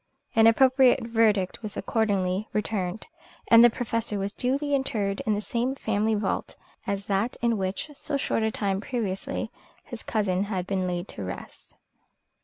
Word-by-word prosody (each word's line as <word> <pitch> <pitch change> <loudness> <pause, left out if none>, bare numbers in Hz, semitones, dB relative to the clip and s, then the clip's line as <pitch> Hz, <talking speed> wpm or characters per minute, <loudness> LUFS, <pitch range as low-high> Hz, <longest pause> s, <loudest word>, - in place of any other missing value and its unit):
An 225 0 +7
appropriate 260 +2 +5
verdict 220 -5 +2
was 215 -2 -6
accordingly 200 -2 0
returned, 210 -2 -2 0.4
and 230 0 +9
the 240 - +8
Professor 230 -2 -2
was 200 +1 -2
duly 280 +3 -1
interred 210 -8 0
in 215 - +3
the 205 - -2
same 245 +5 -1
family 220 -3 0
vault 210 - -2 0.3
as 200 0 -2
that 205 +4 0
in 235 -1 +3
which 190 +3 -2
so 285 0 -3
short 265 - 0
a 220 - +2
time 200 -3 -1
previously 210 -6 -3 0.3
his 240 -3 -9
cousin 200 -3 0
had 190 -3 -3
been 190 -1 -1
laid 175 +1 -3
to 100 - -6
rest. 95 0 -8
215 Hz, 160 wpm, -26 LUFS, 195-235 Hz, 0.4 s, and